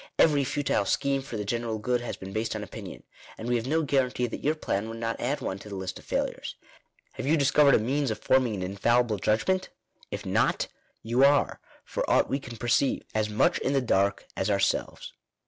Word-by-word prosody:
Every 145 -3 +5
futile 135 -6 0
scheme 140 +4 +1
for 120 -4 -6
the 105 - -3
general 115 +1 -2
good 120 +3 0
has 120 - -5
been 95 0 -8
based 110 +1 -1
on 105 - -4
opinion; 100 - -9 0.3
and 110 - -6
we 120 - +2
have 115 +2 -4
no 160 +3 +1
guarantee 130 -3 +1
that 120 - -6
your 150 +2 +2
plan 105 -8 -2
will 115 - -6
not 115 0 -3
add 135 +5 -1
one 95 - -3
to 105 - -11
the 100 - -6
list 95 -1 -5
of - - -17
failures. - - -2 0.6
Have - - -5
you 160 +3 +4
discovered 140 0 +5
a - - +4
means 135 +5 0
of 110 - -2
forming 130 -4 +2
an 95 - -4
infallible 110 +3 +1
judg 110 +3 +1
ment? 185 0 +1 0.4
If - - -5
not, - - +1 0.4
you 120 +4 +2
are, 140 +1 +4 0.3
for - - -2
aught - - +3
we 135 - +1
can 120 -4 -9
perceive, 120 +4 +1
as 110 0 0
much 105 - +2
in 135 - 0
the 135 - +3
dark 100 -4 +1
as 95 - -1
ourselves. 100 -1 0
120 Hz, 215 wpm, -27 LUFS, 105-135 Hz, 0.6 s, Every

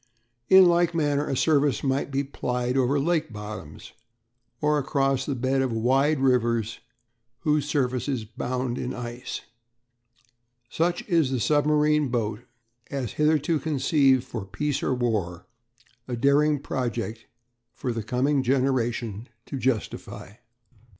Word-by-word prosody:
In 190 0 +9
like 170 -1 +3
manner 145 -2 +1
a 135 - -1
service 145 -5 +2
might 135 0 0
be 140 0 -1
plied 125 -2 -2
over 135 +2 +2
lake 160 -1 0
bottoms, 105 -7 -8 0.7
or 150 0 +2
across 135 -1 0
the 140 - -1
bed 130 +2 0
of 130 -2 0
wide 135 +6 +2
rivers 115 -4 +1 0.6
whose 150 -2 +1
surface 130 -3 0
is 130 -6 -2
bound 125 +2 -3
in 130 +1 -4
ice. 120 +1 -6 1.3
Such 175 +2 -1
is 165 -8 +2
the 130 -1 -1
submarine 150 +2 +2
boat 110 -3 -1 0.5
as 130 -7 -3
hitherto 150 +1 +1
conceived 135 -3 +2
for 120 -5 -6
peace 135 +10 -2
or 130 - 0
war 100 -8 -2 0.6
a 125 - -3
daring 140 +4 +3
project 120 -4 -4 0.4
for 125 - -4
the 115 - -3
coming 130 +6 +1
generation 120 -4 -1 0.2
to 135 - -5
justify. 120 -5 -3
130 Hz, 130 wpm, -25 LUFS, 120-145 Hz, 1.3 s, In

